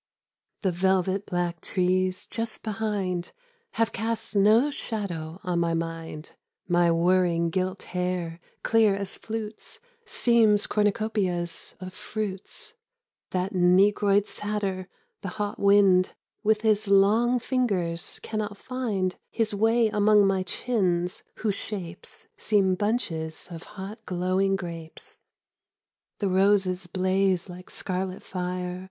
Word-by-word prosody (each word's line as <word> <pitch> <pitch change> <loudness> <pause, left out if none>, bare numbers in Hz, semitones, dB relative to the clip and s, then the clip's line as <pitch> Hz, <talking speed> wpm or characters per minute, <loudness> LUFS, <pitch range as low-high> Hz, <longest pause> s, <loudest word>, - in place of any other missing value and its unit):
T^HE 190 - +2
velvet 190 +2 +1
black 175 -2 -2
trees 185 0 0
just 225 -1 -3
behind 205 -5 -1
•■■ - - -17 0.4
Have 225 -1 +1
cast 225 +1 -2
no 220 +8 +5
shadow 180 - -4
on 175 -1 0
my 170 -1 +1
mind; 165 -2 -5 0.4
My 175 -1 +4
whirring 170 0 +3
gilt 185 +2 -1
hair, 180 -2 -2 0.2
clear 220 -3 +4
as 200 -1 -3
flutes, 220 -1 -6 0.3
Seems 225 -4 +4
cornucopias 205 -4 -1
of 185 -1 -7
fruits; 210 - -5 0.6
That 185 +2 -1
negroid 195 +3 +4
satyr 200 -4 -3 0.3
the - - -5
hot 205 -1 -2
wind 200 -2 +5 0.3
With 215 0 +2
his 215 -1 +2
long 210 +5 +4
fingers 200 -10 0
cannot 215 -2 -3
find 210 -9 -2
His 225 -2 0
way 225 +3 +3
among 210 0 +5
my 195 -1 +2
chins, 185 -3 0
whose 215 -2 -1
shapes 190 -4 -6
Seem 195 -3 +3
bunches 180 -7 -1
of 165 -1 -7 0.2
hot 195 +4 -7
glowing 185 +2 +1
grapes. 170 -4 -7 0.5
— - - -66
The 205 - 0
roses 190 -1 +2
blaze 185 0 +1
like 180 0 -10
scarlet 185 0 -3
fire. 180 0 -3
190 Hz, 120 wpm, -26 LUFS, 180-210 Hz, 0.6 s, no